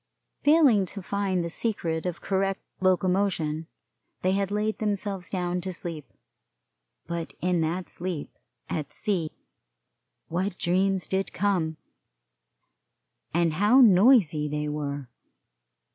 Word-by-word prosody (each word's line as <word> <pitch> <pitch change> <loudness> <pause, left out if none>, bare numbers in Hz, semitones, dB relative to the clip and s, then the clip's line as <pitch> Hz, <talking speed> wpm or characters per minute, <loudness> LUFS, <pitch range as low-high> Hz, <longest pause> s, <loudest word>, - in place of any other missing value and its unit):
Failing 285 - +5
to 200 - -7
find 195 -2 -1
the - - -3
secret 170 -6 -1
of 175 -1 -4
correct 195 0 0 0.2
locomotion, 180 -4 +1 0.6
they 185 - +3
had 195 0 0
laid 210 +1 -1
themselves 200 -3 -2
down 180 -1 -1
to 185 +1 -3
sleep, 165 -4 -7 0.9
but 170 -1 -5
in 180 -1 +1
that 170 +3 -1
sleep 175 -4 -5 0.3
at 155 -3 -3
sea 180 -7 -1 1.0
what 185 +3 -2
dreams 185 0 +1
did 190 0 -1
come, 175 -5 0 1.5
and 170 -1 +2
how 210 +9 +5
noisy 190 - +6
they 150 0 -2
were! 145 -2 -3
185 Hz, 115 wpm, -27 LUFS, 165-200 Hz, 1.5 s, noisy